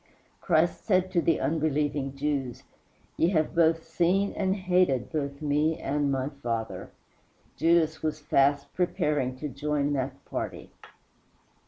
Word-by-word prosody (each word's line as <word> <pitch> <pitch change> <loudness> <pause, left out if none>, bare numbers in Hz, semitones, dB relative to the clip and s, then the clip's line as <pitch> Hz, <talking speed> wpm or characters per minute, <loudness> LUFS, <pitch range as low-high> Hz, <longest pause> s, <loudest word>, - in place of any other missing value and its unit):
Christ 170 -1 +1
said 185 -3 +2
to 175 -2 +2
the 165 -1 +2
unbelieving 145 -3 -1
Jews, 140 -3 -2 0.5
"Ye 165 - +3
have 155 -2 +1
both 165 -1 +3
seen 180 +4 +1
and 190 -1 0
hated 180 - +1
both 140 -1 -3
Me 150 +2 +1
and 145 -2 -1
my 135 0 -1
Father." 115 -3 -3 0.7
Judas 160 0 +2
was 155 -1 -2
fast 140 -1 +1
preparing 150 -8 0
to 150 - -4
join 145 0 -1
that 135 0 -3
party. - - -5
150 Hz, 130 wpm, -27 LUFS, 140-170 Hz, 0.7 s, Ye